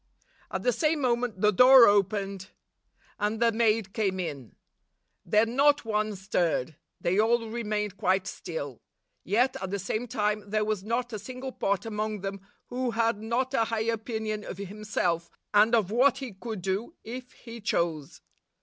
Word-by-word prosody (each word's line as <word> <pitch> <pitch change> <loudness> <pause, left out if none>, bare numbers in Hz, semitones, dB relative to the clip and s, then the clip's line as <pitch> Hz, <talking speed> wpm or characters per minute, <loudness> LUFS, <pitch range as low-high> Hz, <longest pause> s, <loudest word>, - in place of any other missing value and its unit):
At - - -4
the - - +3
same 315 -7 +1
moment 240 -6 0
the 210 - +5
door 250 +3 +8
opened, 195 -1 +1 0.7
and 210 +1 -1
the 235 0 +4
maid 220 -3 +1
came 195 -4 0
in. 145 -9 -5 0.7
Then 215 +6 +2
not 290 -1 +4
one 215 -1 -1
stirred. 175 -7 -1 0.2
They 185 +4 +1
all 230 +1 +2
re 235 +1 -3
mained 210 -2 -2
quite 190 +1 +1
still; 160 -9 -6 0.4
yet, 245 +7 +1
at 190 - -3
the 200 - -2
same 215 +5 -3
time, 210 -3 -1
there 215 0 +1
was 215 -3 -2
not 235 +2 -2
a 215 - -3
single 255 +5 -7
pot 200 -5 -1
among 215 -2 -3
them 195 0 -5 0.3
who 250 0 -1
had 230 -2 +1
not 245 +4 -1
a 230 - +3
high 225 0 -2
opinion 220 -1 -2
of 190 - -7
himself, 195 -4 -2 0.2
and 215 +3 +5
of 210 -4 +1
what 255 +3 +4
he 265 -5 -6
could 210 -1 -6
do 200 - -2
if 250 +2 -8
he 235 -1 -11
chose. 165 -7 -2
215 Hz, 170 wpm, -28 LUFS, 195-235 Hz, 0.7 s, door